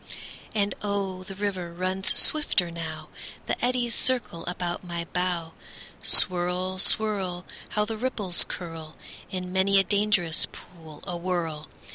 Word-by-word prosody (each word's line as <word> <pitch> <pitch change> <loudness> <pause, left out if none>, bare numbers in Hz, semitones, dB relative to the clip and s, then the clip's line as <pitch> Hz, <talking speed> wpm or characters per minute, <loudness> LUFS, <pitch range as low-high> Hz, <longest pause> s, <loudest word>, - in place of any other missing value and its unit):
And 205 -1 +2
oh, 200 -2 -1
the 195 0 -8
river 190 -4 -2
runs 185 +2 0
swifter 210 - +5
now; 160 -2 -6 0.4
The - - -2
eddies 245 -1 +1
circle 240 -10 +2
about 180 0 -2
my 170 -1 -4
bow. 175 -2 -1 0.5
Swirl, 180 +1 +2
swirl! 190 -4 +1 0.3
How 210 - +4
the 220 0 -4
ripples 215 -8 +1
curl 165 -3 -7 0.3
In 180 -1 -4
many 195 +1 +4
a 195 - +6
dangerous 200 -5 +2
pool 160 -4 -12
awhirl! 175 -4 -2
185 Hz, 125 wpm, -27 LUFS, 170-200 Hz, 0.5 s, a